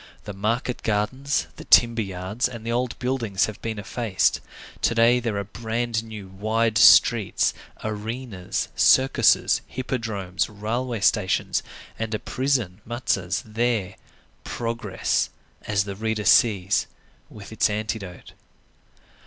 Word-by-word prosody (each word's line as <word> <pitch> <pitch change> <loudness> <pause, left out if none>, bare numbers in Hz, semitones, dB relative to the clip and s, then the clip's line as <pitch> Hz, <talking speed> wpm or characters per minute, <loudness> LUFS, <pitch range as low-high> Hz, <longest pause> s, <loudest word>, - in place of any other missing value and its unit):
The 105 - -7
market 115 +5 -2
gardens, 115 +7 -1
the - - -9
timber 115 -1 +5
yards, 95 +5 -2
and 120 -2 -9
the 115 - -2
old 120 +1 -1
buildings 120 -6 0
have 110 - -8
been 110 -1 -4
effaced. 105 0 0 0.4
To 115 - +1
day, 115 +2 +5
there 115 -4 -2
are 100 - -1
brand 115 +2 -3
new, 110 -3 -9
wide 110 +4 0
streets, 115 -3 +5 0.3
arenas, 110 -2 -4
circuses, 130 0 +4
hippodromes, 110 -8 -3
railway 115 +3 -3
stations, 100 -2 +1 0.4
and 110 -1 -2
a - - -3
prison, 125 -8 -1
Mazas, 110 -5 -2
there; 110 -3 -1 0.5
progress, 115 0 -2 0.4
as 100 -2 +1
the 100 -1 -6
reader 110 0 -2
sees, 100 -4 +4 0.4
with 105 -1 -12
its 110 +1 +2
antidote. 105 -3 -5
110 Hz, 120 wpm, -24 LUFS, 100-120 Hz, 0.5 s, timber